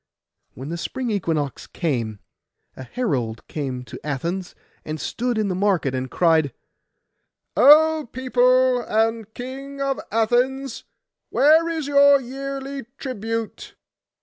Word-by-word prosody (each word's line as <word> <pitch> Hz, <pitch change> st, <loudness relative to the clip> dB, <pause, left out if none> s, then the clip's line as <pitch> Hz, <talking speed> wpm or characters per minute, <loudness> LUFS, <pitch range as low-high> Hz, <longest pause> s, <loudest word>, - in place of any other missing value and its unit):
And -, -, -18 dB
when 135 Hz, +3 st, -6 dB
the 170 Hz, +1 st, -4 dB
spring 250 Hz, +6 st, -3 dB
equinox 160 Hz, -, -2 dB
came, 120 Hz, -, -2 dB, 0.6 s
a -, -, -9 dB
herald 130 Hz, -, -3 dB
came 130 Hz, -4 st, -4 dB
to 115 Hz, -, -11 dB
Athens, 170 Hz, +6 st, -3 dB, 0.3 s
and 155 Hz, 0 st, -5 dB
stood 240 Hz, +6 st, -2 dB
in 215 Hz, -1 st, +1 dB
the 190 Hz, -, -1 dB
market, 185 Hz, -8 st, +1 dB
and 130 Hz, 0 st, -3 dB
cried, 160 Hz, -4 st, +2 dB, 1.0 s
'O 310 Hz, -1 st, +6 dB
people 255 Hz, 0 st, +3 dB
and 225 Hz, -1 st, 0 dB
King 275 Hz, +3 st, -7 dB
of 275 Hz, -1 st, -1 dB
Athens, 245 Hz, +4 st, 0 dB, 0.4 s
where 320 Hz, +4 st, +4 dB
is 320 Hz, -3 st, -2 dB
your 285 Hz, 0 st, +6 dB
yearly 275 Hz, 0 st, -6 dB
tribute? 225 Hz, -3 st, -5 dB
230 Hz, 120 wpm, -22 LUFS, 160-270 Hz, 1.0 s, O